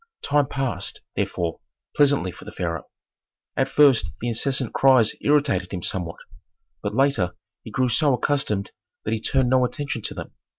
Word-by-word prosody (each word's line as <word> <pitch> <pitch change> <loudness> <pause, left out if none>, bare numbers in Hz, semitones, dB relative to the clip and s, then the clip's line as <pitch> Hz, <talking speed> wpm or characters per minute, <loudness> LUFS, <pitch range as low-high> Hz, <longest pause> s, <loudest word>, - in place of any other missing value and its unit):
Time 145 -1 +2
passed, 135 -2 -3
therefore, 85 -2 -2 0.4
pleasantly 145 -10 +3
for - - -13
the - - -9
pharaoh. 85 -3 -3 0.7
At 135 0 +1
first 135 -12 +5
the 120 - -2
incessant 130 +1 -1
cries 130 -5 +5
irritated 140 -11 +2
him 90 -3 -4
somewhat, 85 -3 -2 0.6
but 105 +1 -3
later 135 -9 +2 0.3
he - - -8
grew 130 -1 +1
so 145 +4 +3
accustomed 125 -8 -1 0.3
that 110 - 0
he 110 - -2
turned 130 +1 +1
no 130 -1 +5
attention 140 -1 -3
to - - -4
them. - - -7
125 Hz, 160 wpm, -24 LUFS, 100-140 Hz, 0.7 s, first